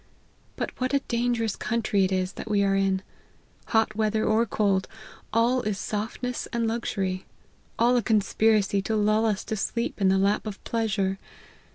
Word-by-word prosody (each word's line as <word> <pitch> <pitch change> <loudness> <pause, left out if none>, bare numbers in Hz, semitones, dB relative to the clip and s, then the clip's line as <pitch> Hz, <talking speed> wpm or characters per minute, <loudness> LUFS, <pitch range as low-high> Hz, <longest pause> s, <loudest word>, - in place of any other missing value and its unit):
But - - -3
what 255 +2 +1
a - - +4
danger 240 -2 0
ous 220 -3 -1
country 215 -4 0
it 190 - -2
is 185 0 0
that - - -7
we 205 -1 +3
are 195 0 +2
in; 195 -1 +1 0.6
hot 220 -1 +2
weather 215 0 +1
or 225 +2 +2
cold, 195 -2 +1 0.4
all 240 +3 +3
is 210 -3 -2
softness 225 +4 -3
and 235 -1 0
luxury; 195 -5 -2 0.5
all 240 +2 +4
a 245 - +3
conspiracy 215 -1 +2
to 220 +3 -2
lull 215 +1 +3
us 205 -3 -1
to 220 - -3
sleep 235 +2 -2
in 195 - +4
the 190 - +3
lap 200 +3 +1
of 205 -2 -5
pleasure. 195 -4 -1
215 Hz, 175 wpm, -26 LUFS, 195-230 Hz, 0.6 s, a